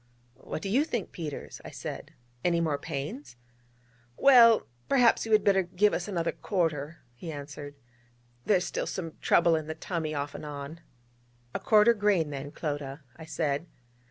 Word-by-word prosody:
'What 155 - -7
do 195 - -3
you 260 +9 +3
think, 240 - -3
Peters?' 155 -4 -7
I - - -8
said: - - -7 0.3
'any 170 -1 +2
more 155 -4 0
pains?' 145 - -6 0.8
'Well, 235 -5 +7 0.2
perhaps 245 -4 +4
you - - -4
had 215 -1 +5
better 195 -1 +4
give 185 +3 +2
us - - -2
another 170 -5 -1
quarter,' 165 -5 -2
he 160 +7 -7
answered: 145 0 -8 0.7
'there's 185 -3 +3
still - - -3
some 165 -4 -4
trouble 170 -1 +4
in 155 -1 -3
the 160 - -4
tummy 160 -2 -3
off 145 0 -3
and - - -8
on.' 145 +2 -7 0.7
'A - - -2
quarter 215 +1 +5
grain, 200 -8 +1
then, 140 0 -6
Clodagh, 145 -2 -4 0.2
'I 160 - -9
said. 155 0 -2
165 Hz, 160 wpm, -28 LUFS, 145-205 Hz, 0.8 s, Well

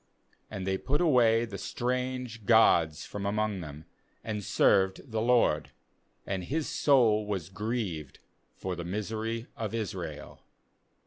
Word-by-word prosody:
16And 95 - -5
they 95 0 0
put 145 +3 0
away 120 -8 +4
the 100 -4 -7
strange 125 -2 -3
gods 85 -9 +4
from 100 - -6
among 105 -1 -1
them, 75 -1 -9 0.4
and 105 -2 -4
served 95 +4 +2
the 110 -1 -1
LORD; 115 -10 +3 0.6
and 95 -2 -3
His 150 - -2
soul 115 -7 +3
was 95 -5 -3
grieved 95 - -4 0.4
for 95 -1 -4
the 85 - -5
misery 110 +5 -3
of 115 -4 -4
Israel. 90 -9 -5
105 Hz, 130 wpm, -29 LUFS, 95-115 Hz, 0.6 s, away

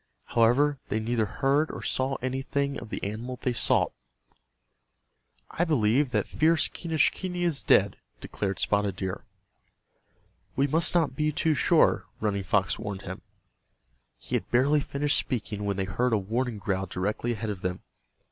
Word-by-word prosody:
However, 130 +5 +3
they 110 - 0
neither 110 -1 0
heard 140 +7 +1
or - - -7
saw 130 +1 0
anything 135 +2 -1
of 115 - -9
the - - -5
animal 115 +5 -4
they 125 - -1
sought. - - +2 1.6
"I 175 - 0
believe 135 -3 +2
that - - 0
fierce 160 0 +3
Quenischquney 175 +2 0
is 165 -5 0
dead," 100 -1 +3 0.2
declared 100 -2 -3
Spotted 100 -2 0
Deer. 95 -1 -4 1.3
"We 135 - +3
must 160 +4 +2
not 160 -6 +2
be 155 +1 +1
too 155 +2 +1
sure," 140 - +3
Running 105 -2 -1
Fox 95 0 0
warned 100 -1 -5
him. 95 +1 -7 1.0
He - - -4
had - - -2
barely 140 +5 +3
finished 145 +1 +1
speaking 105 -4 -3
when 100 -1 -1
they 95 - 0
heard 115 +6 0
a - - +4
warning 115 +4 -2
growl 95 -1 -2
directly 105 +6 -2
ahead 110 -1 -3
of 95 -3 -7
them. 90 0 -3
120 Hz, 155 wpm, -27 LUFS, 100-145 Hz, 1.6 s, a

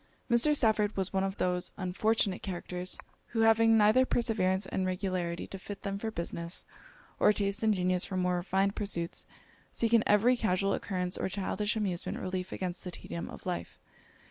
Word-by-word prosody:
Mr. 295 +6 +5
Stafford 215 -4 +2
was 190 0 0
one 190 0 +1
of 195 0 -2
those 180 -1 0
unfortunate 195 +1 +1
characters, 180 -1 -3 0.3
who 225 - -1
having 225 0 +5
neither 215 +4 +5
perseverance 215 -6 +1
and 190 - -2
regularity 185 -2 -2
to 195 - -8
fit 200 +1 -8
them 200 -1 -3
for 225 - -2
business, 170 -3 -4 0.5
or - - +6
taste 200 0 -1
and 220 -2 +3
genius 180 -1 +1
for 190 - -3
more 180 -1 +1
refined 195 +2 0
pursuits, 170 -5 -2 0.4
seek, 230 0 +1
in 230 -1 +6
every 220 +5 +5
casual 195 -4 +1
occurrence 180 -2 -2
or - - -1
childish 205 +2 -1
amusement, 195 -5 -1
relief 185 0 -4
against 180 -1 -4
the 180 - -5
tedium 170 -1 -6
of - - -11
life. 180 -1 -4
195 Hz, 170 wpm, -31 LUFS, 180-215 Hz, 0.5 s, or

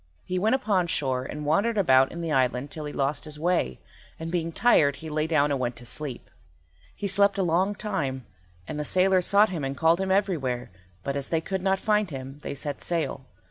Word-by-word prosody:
He 180 0 -1
went 220 +6 +3
upon 205 -9 +1
shore 130 -5 -1
and 150 +2 -6
wandered 205 +9 +2
about 135 -8 +4
in 170 - -6
the 165 -2 -3
island 130 0 +1
till 155 -1 -6
he 150 - -5
lost 140 +2 -1
his 150 -1 -5
way, 170 - 0 0.4
and 165 0 -5
being 165 -2 -1
tired 155 -9 +4
he 160 +1 -8
lay 155 +1 0
down 150 -3 +2
and 140 - 0
went 120 -1 -2
to 120 +1 -11
sleep. 135 +1 -6 0.6
He 205 - -5
slept 200 +1 +3
a 195 - +2
long 185 +4 +1
time, 145 - -3 0.4
and 150 - -4
the - - -1
sailors 185 +3 +3
sought 205 +1 +5
him 170 -6 -4
and 135 0 -3
called 165 +4 +3
him 190 - -1
everywhere, 160 - 0 0.3
but 140 - -2
as 140 -1 -3
they 165 - +1
could 190 +3 -3
not 190 +1 +2
find 210 -1 +1
him 135 0 -7
they - - -5
set 145 0 -4
sail. 145 -6 -2
160 Hz, 220 wpm, -26 LUFS, 140-190 Hz, 0.6 s, sought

